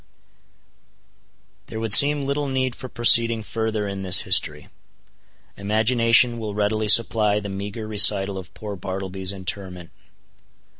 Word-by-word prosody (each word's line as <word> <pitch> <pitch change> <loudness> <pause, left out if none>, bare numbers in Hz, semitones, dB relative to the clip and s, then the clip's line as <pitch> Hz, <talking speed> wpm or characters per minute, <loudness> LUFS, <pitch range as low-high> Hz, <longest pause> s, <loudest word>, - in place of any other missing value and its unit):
There 110 - -9
would 110 -2 0
seem 145 +2 +6
little 140 +1 -4
need 130 -1 -3
for 130 - -11
proceeding 115 -1 +3
further 110 -1 -5
in 100 -1 -7
this 95 -1 +4
history. 75 -6 -1 0.9
Imagination 115 +3 +1
will 105 -2 -7
readily 105 +1 -3
supply 105 -1 +3
the 100 -1 -9
meager 100 +3 -8
recital 100 -2 +2
of 90 - -13
poor 105 -2 -9
Bartleby's 95 0 -7
interment. 95 -2 -7
105 Hz, 120 wpm, -20 LUFS, 95-115 Hz, 0.9 s, seem